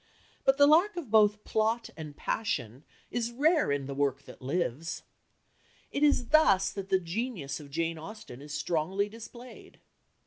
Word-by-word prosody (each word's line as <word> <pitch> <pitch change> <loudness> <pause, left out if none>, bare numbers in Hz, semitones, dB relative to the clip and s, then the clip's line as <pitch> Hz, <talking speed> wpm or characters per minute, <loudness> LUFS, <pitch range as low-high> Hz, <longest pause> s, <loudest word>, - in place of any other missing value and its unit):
But 270 0 +4
the 285 - +7
lack 345 +7 +4
of 290 -11 -5
both 210 -1 +4
plot 225 +2 0
and 150 -3 -8
passion 130 - -2 0.3
is 235 -1 -1
rare 300 - +3
in 140 -1 -1
the 140 - -5
work 140 -1 0
that - - -13
lives. 155 +1 -2 0.9
It 280 - -2
is 285 -5 +3
thus 200 -12 +5
that 195 -1 -6
the 190 - +3
genius 175 - -4
of 145 -2 -11
Jane 165 +2 -2
Austen 160 - -10
is 145 +1 -10
strongly 180 +7 -1
displayed. 235 +3 -12
195 Hz, 160 wpm, -29 LUFS, 150-240 Hz, 0.9 s, the